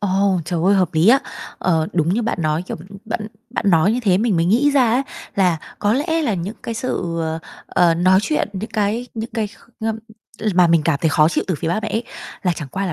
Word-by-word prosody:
Ồ, 195 Hz, -1 st, +1 dB
trời 170 Hz, +1 st, -2 dB
ơi 195 Hz, +2 st, +5 dB
hợp 185 Hz, -3 st, +3 dB
lý 160 Hz, +5 st, +4 dB
á. 260 Hz, +4 st, +7 dB, 0.4 s
Ờ, 160 Hz, -3 st, +1 dB
đúng 165 Hz, -2 st, +1 dB
như 235 Hz, -, 0 dB
bạn 230 Hz, -, -2 dB
nói, 155 Hz, +1 st, 0 dB
kiểu, 180 Hz, -, -6 dB
b -, -, -15 dB, 0.2 s
bạn 220 Hz, -1 st, -3 dB, 0.2 s
bạn 245 Hz, -, -3 dB
nói 170 Hz, +4 st, +4 dB
như 245 Hz, -, -1 dB
thế 190 Hz, -6 st, +3 dB
mình 215 Hz, -3 st, +1 dB
mới 165 Hz, -, +2 dB
nghĩ 240 Hz, +11 st, +3 dB
ra 260 Hz, -5 st, +3 dB
á 250 Hz, +4 st, +2 dB, 0.3 s
là 180 Hz, -4 st, +3 dB, 0.2 s
có 205 Hz, 0 st, +2 dB
lẽ 320 Hz, +6 st, 0 dB
là 230 Hz, -9 st, 0 dB
những 185 Hz, +4 st, -4 dB
cái 230 Hz, -, -4 dB
sự, 200 Hz, -8 st, -2 dB
ờ, 160 Hz, 0 st, -2 dB, 0.3 s
ờ, 170 Hz, -2 st, +3 dB
nói 185 Hz, +3 st, +4 dB
chuyện, 300 Hz, +2 st, 0 dB
những 205 Hz, +3 st, -5 dB
cái 220 Hz, +2 st, -1 dB
những 225 Hz, 0 st, -5 dB
cái 220 Hz, -3 st, 0 dB
kh 225 Hz, +2 st, -20 dB, 0.2 s
ơm, 220 Hz, 0 st, -1 dB, 0.6 s
mà 180 Hz, -1 st, +6 dB
mình 165 Hz, -2 st, +3 dB
cảm 155 Hz, -3 st, +2 dB
thấy 160 Hz, -, +4 dB
khó 155 Hz, 0 st, +4 dB
chịu -, -, -1 dB
từ 185 Hz, -, 0 dB
phía 160 Hz, +2 st, -3 dB
ba 180 Hz, +5 st, 0 dB
mẹ 215 Hz, -, -2 dB
ấy, 225 Hz, +3 st, -2 dB, 0.4 s
là 180 Hz, -2 st, +2 dB
chẳng 150 Hz, -4 st, -6 dB
qua 195 Hz, +7 st, -3 dB
là 175 Hz, -, -2 dB
195 Hz, 255 wpm, -20 LUFS, 170-225 Hz, 0.6 s, á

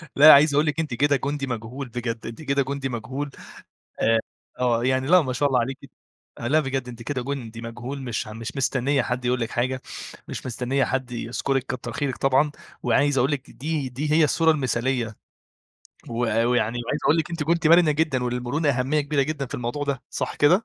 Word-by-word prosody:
لا 150 Hz, +2 st, +10 dB
عايز 145 Hz, +1 st, +6 dB
أقول 150 Hz, +2 st, +3 dB
لِك 150 Hz, +1 st, -1 dB
أنتِ 155 Hz, -6 st, -2 dB
كده 145 Hz, +4 st, +3 dB
جندي 140 Hz, +1 st, -2 dB
مجهول 120 Hz, +2 st, -5 dB
بجد، 115 Hz, -1 st, -4 dB
أنتِ 115 Hz, +6 st, -7 dB
كده 140 Hz, -2 st, +1 dB
جندي 135 Hz, 0 st, -3 dB
مجهول، 130 Hz, +5 st, -4 dB, 0.7 s
آآ، 115 Hz, 0 st, +3 dB, 0.4 s
آه 120 Hz, -2 st, +2 dB
يعني 130 Hz, +1 st, +1 dB
لأ 180 Hz, +1 st, +7 dB
ما 130 Hz, -3 st, -2 dB
شاء 145 Hz, +4 st, +2 dB
الله 125 Hz, -2 st, +3 dB
عليكِ، 130 Hz, +3 st, -2 dB, 0.6 s
لأ 140 Hz, +7 st, +2 dB
بجد 135 Hz, -3 st, -2 dB
أنتِ 120 Hz, -1 st, -8 dB
كده 130 Hz, -1 st, -2 dB
جندي 120 Hz, -4 st, -5 dB
مجهول، 120 Hz, +4 st, -6 dB
مش 120 Hz, -4 st, -3 dB
م 110 Hz, +1 st, -8 dB
مش 120 Hz, +4 st, -6 dB
مستنية 135 Hz, +1 st, +1 dB
حد 125 Hz, +1 st, -3 dB
يقول 125 Hz, +1 st, +1 dB
لِك 115 Hz, -1 st, -2 dB
حاجة، 130 Hz, +1 st, -1 dB, 0.5 s
مش -, -, -6 dB
مستنية 130 Hz, +2 st, 0 dB
حد 130 Hz, -1 st, -2 dB
يذكُرِك 125 Hz, +3 st, -1 dB
كتر 125 Hz, -2 st, -5 dB
خيرِك 135 Hz, +2 st, -2 dB
طبعًا، 135 Hz, +2 st, +3 dB, 0.3 s
وعايز 135 Hz, +3 st, +2 dB
أقول 130 Hz, +4 st, +3 dB
لِك 140 Hz, -1 st, -4 dB
دي 150 Hz, -1 st, -3 dB
دي 145 Hz, +5 st, -3 dB
هي 155 Hz, +1 st, +5 dB
الصورة 160 Hz, +2 st, +4 dB
المثاليّة، 125 Hz, -5 st, -1 dB, 0.9 s
و -, -, -6 dB
ويعني 115 Hz, +1 st, +1 dB
وعايز 145 Hz, -, -1 dB
أقول 150 Hz, -, +4 dB
لِك 160 Hz, -1 st, -1 dB
أنتِ 170 Hz, -2 st, -2 dB
كنتِ 165 Hz, +2 st, +1 dB
مرنة 170 Hz, -1 st, +6 dB
جدًا، 145 Hz, -4 st, 0 dB
وللمرونة 125 Hz, +5 st, -1 dB
أهمية 135 Hz, +3 st, +1 dB
كبيرة 145 Hz, -1 st, +1 dB
جدًا 140 Hz, -1 st, -3 dB
في -, -, -8 dB
الموضوع 125 Hz, +4 st, -3 dB
ده، 140 Hz, -3 st, -2 dB
صح -, -, -3 dB
كده؟ 180 Hz, +9 st, +4 dB
130 Hz, 200 wpm, -24 LUFS, 120-145 Hz, 0.9 s, لا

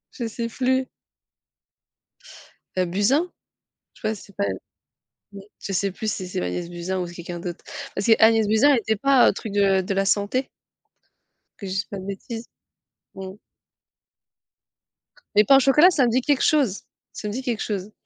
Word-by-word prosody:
Je 240 Hz, -3 st, -3 dB
sais 230 Hz, +1 st, -4 dB
plus. 260 Hz, +2 st, 0 dB, 1.9 s
Heu, 185 Hz, -, +2 dB
Buzyn? 265 Hz, -, +2 dB, 0.6 s
Je -, -, -21 dB
crois, 220 Hz, -1 st, -1 dB
c'est 200 Hz, -1 st, -15 dB
pas -, -, 0 dB, 1.1 s
je 195 Hz, -, -5 dB
sais 195 Hz, +1 st, 0 dB
plus 215 Hz, +3 st, -3 dB
si 185 Hz, -, -4 dB
c'est 180 Hz, -, -3 dB
Agnès 90 Hz, -, -3 dB
Buzyn 175 Hz, +2 st, -4 dB
ou 180 Hz, -, -2 dB
c'est 175 Hz, -, -10 dB
quelqu'un 175 Hz, 0 st, -7 dB
d'autre. 175 Hz, -1 st, -6 dB, 0.3 s
Parce 195 Hz, -, -3 dB
qu'Agnès 225 Hz, -1 st, +5 dB
Buzyn, 220 Hz, +7 st, +4 dB
elle 265 Hz, -, +4 dB
était 220 Hz, 0 st, -1 dB
pas, 275 Hz, +4 st, +4 dB
heu, -, -, 0 dB
truc 220 Hz, -, -7 dB
de 195 Hz, -1 st, +3 dB
de 190 Hz, +1 st, -3 dB
la 195 Hz, 0 st, +1 dB
santé? 205 Hz, +7 st, 0 dB, 1.1 s
Que 200 Hz, -, -7 dB
je -, -, -5 dB
dise 195 Hz, +1 st, -1 dB
pas 200 Hz, -, -7 dB
de 185 Hz, -, -9 dB
bêtises. 225 Hz, +4 st, -6 dB, 0.7 s
Mmh. 190 Hz, -1 st, -7 dB, 2.0 s
Mais 210 Hz, -, +7 dB
pain 270 Hz, +6 st, +6 dB
au -, -, +6 dB
chocolat 275 Hz, +6 st, +6 dB
ça 290 Hz, -8 st, +2 dB
me 235 Hz, -, +1 dB
dit 255 Hz, +3 st, +2 dB
quelque 285 Hz, +1 st, +1 dB
chose. 270 Hz, -11 st, +2 dB, 0.3 s
Ça 210 Hz, -, -6 dB
me 205 Hz, -, -4 dB
dit 255 Hz, -, -3 dB
quelque 240 Hz, -4 st, -2 dB
chose. 205 Hz, -1 st, -4 dB
210 Hz, 175 wpm, -23 LUFS, 190-250 Hz, 2.0 s, Mais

